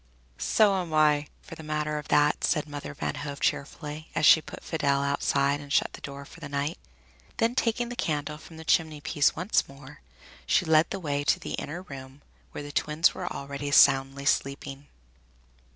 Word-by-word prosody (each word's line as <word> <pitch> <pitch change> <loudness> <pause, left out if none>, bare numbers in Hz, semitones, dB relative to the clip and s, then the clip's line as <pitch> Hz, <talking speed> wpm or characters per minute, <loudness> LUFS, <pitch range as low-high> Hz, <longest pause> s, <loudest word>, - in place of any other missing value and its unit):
"So 200 -3 +3
am 165 -3 -4
I, 150 -1 +4 0.2
for - - -11
the - - -9
matter 150 0 -2
of 150 - -10
that," 150 0 +3
said 155 -2 +1
Mother 145 - -7
Van 75 -1 -3
Hove 140 0 -6
cheerfully, 150 +2 -3
as - - +2
she 160 - +8
put - - -10
Fidel 140 -4 0
outside 140 0 +1
and 145 -1 -11
shut - - +2
the - - -10
door 140 0 -8
for 165 - -14
the 140 -4 -8
night. 145 +3 -2 0.6
Then, 230 +1 +2
taking 240 -1 0
the 245 - -6
candle 150 -5 -2
from 160 0 -13
the 160 - -10
chimney 155 -2 +1
piece 150 -1 +1
once 180 +6 0
more, 140 +1 -13 0.5
she - - +3
led 160 +1 +4
the 195 - -4
way 145 -4 -2
to - - +3
the - - -6
inner 170 +5 -5
room, 135 -3 -11 0.3
where - - -6
the 145 - -8
twins 150 +3 +2
were 180 -1 -5
already 140 +1 -5
soundly 135 -1 +4
sleeping. 140 0 -1
150 Hz, 190 wpm, -27 LUFS, 140-160 Hz, 0.6 s, she